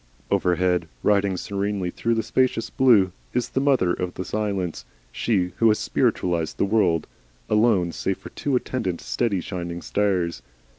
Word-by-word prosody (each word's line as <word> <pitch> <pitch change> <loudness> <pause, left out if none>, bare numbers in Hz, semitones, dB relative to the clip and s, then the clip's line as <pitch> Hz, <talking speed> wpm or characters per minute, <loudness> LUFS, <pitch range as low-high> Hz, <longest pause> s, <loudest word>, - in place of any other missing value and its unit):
Overhead, 90 -2 +2 0.2
riding 100 -2 +2
serenely 100 -1 -2
through 115 +5 0
the 110 - 0
spacious 120 +1 0
blue, 110 -8 +4 0.2
is 125 - 0
the - - -1
mother 130 -11 +3
of 90 -1 -4
the 95 - -4
silence, 95 - -2 0.3
she 90 - 0
who 115 - +4
has 105 -1 +4
spiritualised 85 -3 0
the - - +2
world, 95 -6 +2 0.4
alone 105 -6 +3
save - - -2
for - - -11
two 140 -2 -2
attendant 110 -8 -2
steady 105 -7 -1
shining 85 -1 -5
stars. 90 -8 0
100 Hz, 150 wpm, -24 LUFS, 90-110 Hz, 0.4 s, blue